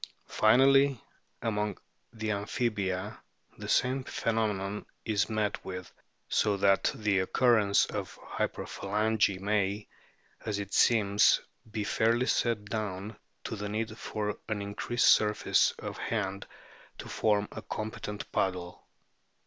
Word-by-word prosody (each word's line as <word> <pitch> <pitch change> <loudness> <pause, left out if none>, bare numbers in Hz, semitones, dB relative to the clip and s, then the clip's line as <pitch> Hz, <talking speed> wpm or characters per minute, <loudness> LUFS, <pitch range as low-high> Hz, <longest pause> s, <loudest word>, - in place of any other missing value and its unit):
Finally, 135 +4 +5 0.4
among 105 -2 -1 0.3
the 110 -2 -3
Amphibia 100 -1 -2 0.4
the - - -6
same 130 +1 +2
phenomenon 105 -4 -1 0.2
is 105 -2 +1
met 105 -2 -1
with, 90 -2 -7 0.3
so 105 -1 +2
that 100 0 +3
the 105 -3 +1
occurrence 105 +1 +3
of - - -5
hyperphalangy 105 -1 -1
may, 100 0 0 0.6
as 105 -2 -2
it 100 -1 -5
seems, 105 -3 +4 0.3
be 110 -1 -3
fairly 115 +4 +2
set 115 -5 +1
down 105 0 -4 0.3
to - - -4
the 105 -1 -4
need 110 +1 -3
for 105 -2 -4
an 110 -1 -1
increased 105 +4 0
surface 105 -2 +4
of - - -6
hand 100 -3 -2 0.5
to - - -8
form 105 -1 +1
a - - -7
competent 105 -1 -5
paddle. 90 -2 -2
105 Hz, 115 wpm, -30 LUFS, 100-110 Hz, 0.6 s, Finally